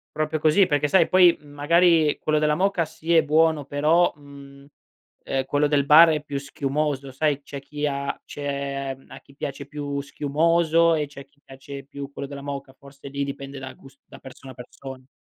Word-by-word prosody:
Proprio 155 0 -1
così, 160 +5 +4
perché 145 0 +1
sai 170 +2 +4
poi, 180 -2 +5
mhmm, 145 - -17
magari 165 +1 +3
quello 155 0 +1
della 150 0 +2
moka 190 0 +1
sì 165 +2 -3
è 160 - +5
buono 155 -1 +2
però, 155 +5 +2
mhmm, 140 -1 -15 0.6
ehm, 135 -1 -2
quello 145 +1 +1
del 140 -1 +1
bar 160 +3 +8
è 150 -1 -1
più 140 -2 -5
schiumoso 140 0 -3
sai, 145 0 -1
c'è 140 0 -8
chi 150 +1 -4
ha 140 0 -3
c'è 140 -1 -4
a - - -11
chi 140 - -21
piace 140 0 -6
più 145 -1 -5
schiumoso, 165 +3 +2
e 150 -2 -1
c'è 140 -1 -12
a - - -11
chi 145 +1 -35
piace 135 +1 -10
più 140 0 -9
quello 140 - -6
della 140 -1 -8
moka, 140 -1 -7
forse 140 0 -13
lì 140 0 -3
dipende 140 0 -7
da 130 0 -8
gus 135 +1 -18
da - - -14
persona 130 0 -12
a - - -18
person 130 +1 -11
145 Hz, 195 wpm, -23 LUFS, 140-155 Hz, 0.6 s, bar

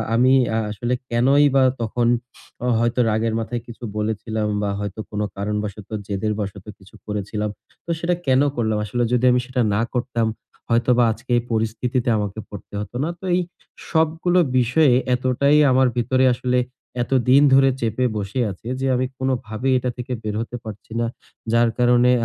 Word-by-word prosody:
আমি 130 +3 +4 0.4
আসলে 120 +4 -2 0.2
কেনই 135 +5 +4
বা 135 - +5 0.2
তখন 115 +1 0 0.7
হয়তো 120 +1 0
রাগের 110 +1 0
মাথায় 115 +1 -3
কিছু 120 +1 -11
বলেছিলাম 110 0 -2 0.2
বা 100 - 0
হয়তো 105 +1 -5
কোন 105 - -2 0.2
কারণবশত 105 0 -4 0.2
জেদের 105 +1 -1
বশত 100 -2 -5
কিছু 95 -1 -18
করেছিলাম। 105 0 -3 0.4
তো - - -15
সেটা 175 +1 0
কেন 130 +1 +4
করলাম 110 -3 0
আসলে 120 +4 -1
যদি 125 0 +2
আমি 125 - +3
সেটা 125 0 -1
না 110 - +1
করতাম, 120 -2 0 0.4
হয়তোবা 120 +1 +3
আজকে 120 +3 -8
এই - - +1
পরিস্থিতিতে 115 +3 -1
আমাকে 105 0 -3
পড়তে 100 0 -11
হত 105 - -8
না। 165 - -1
তো - - -20
এই 180 - +2 0.5
সবগুলো 160 +3 +2 0.2
বিষয়ে 125 +3 +4 0.2
এতটাই 130 +3 +2
আমার 130 0 +4
ভিতরে 130 +2 +2
আসলে 125 0 0 0.4
এতদিন 130 +2 +4
ধরে 135 0 +6
চেপে 115 +3 0
বসে 105 +5 -3
আছে 95 +5 -11
যে 135 - -1
আমি 130 +1 +1
কোনভাবেই 130 -1 -1
এটা 125 0 -1
থেকে 125 +1 -4
বের 105 -1 -3
হতে 120 +1 -6
পারছি 110 0 -10
না। 120 - +1 0.5
যার 115 0 +4
কারণে 125 0 +4
120 Hz, 160 wpm, -22 LUFS, 110-130 Hz, 0.7 s, ধরে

